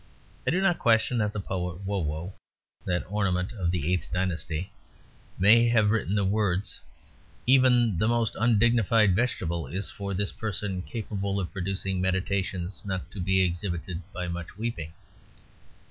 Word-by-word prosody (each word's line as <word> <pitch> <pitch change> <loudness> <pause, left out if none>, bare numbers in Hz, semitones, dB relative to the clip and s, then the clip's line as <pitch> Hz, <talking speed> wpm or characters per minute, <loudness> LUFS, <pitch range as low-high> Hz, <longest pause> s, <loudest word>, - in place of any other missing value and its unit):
I - - +5
do 180 +3 +2
not 195 -3 +3
question 115 +1 +3
that 105 -1 +1
the 105 - -4
poet 90 -2 -4
Wo 100 0 -1
Wo 80 +3 -3 0.5
(that 90 -1 0
ornament 95 -2 0
of 95 -6 -1
the 85 0 0
eighth 90 - -2
dynasty) 90 0 -2 0.7
may 115 +5 +6
have 110 -3 +4
written 105 -3 0
the 100 -1 +2
words: 100 -1 0 0.7
"Even 125 -6 +4
the 110 - +2
most 115 -2 +1
undignified 115 -3 +4
vegetable 90 -8 -1
is 95 +2 -3
for 100 -1 -4
this 100 +1 -1
person 100 -3 -2
capable 100 -2 -3
of 90 - -4
producing 95 0 -2
meditations 95 0 -1
not 95 -2 -4
to 100 - -8
be 95 +1 +2
exhibited 85 -1 -2
by 90 -1 -4
much 85 +1 -6
weeping." 105 -8 -4
95 Hz, 150 wpm, -27 LUFS, 90-110 Hz, 0.7 s, may